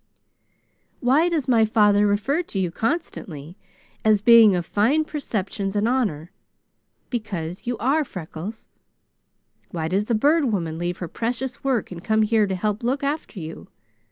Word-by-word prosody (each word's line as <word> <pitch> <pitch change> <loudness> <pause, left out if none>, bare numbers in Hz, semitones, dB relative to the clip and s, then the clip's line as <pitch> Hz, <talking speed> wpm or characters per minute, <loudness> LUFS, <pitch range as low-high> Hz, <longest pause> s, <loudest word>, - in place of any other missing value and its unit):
"Why 280 +8 +3
does 320 -6 -1
my 235 -3 +4
father 210 -2 +4
refer 215 +11 +1
to 320 - -7
you 180 -3 0
constantly 180 - -4 0.5
as 215 -1 +4
being 225 -2 +7
of 175 -1 -2
fine 265 - +2
perceptions 205 -9 -3
and 205 +2 +1
honor? 200 - -1 0.8
Because 190 -6 -4
you 245 -1 -1
are, 275 +8 +1
Freckles. 185 - -8 1.0
Why 160 -2 -3
does 195 +5 0
the 230 - 0
Bird 295 +7 +3
Woman 170 -9 -2
leave 175 +1 -2
her 175 - -5
precious 245 +7 -4
work 260 -8 0
and 170 -1 -8
come 220 0 +2
here 215 -1 +2
to 190 - -2
help 210 +2 -2
look 260 +4 -1
after 280 -7 -3
you? 160 -1 -8
215 Hz, 155 wpm, -23 LUFS, 185-250 Hz, 1.0 s, being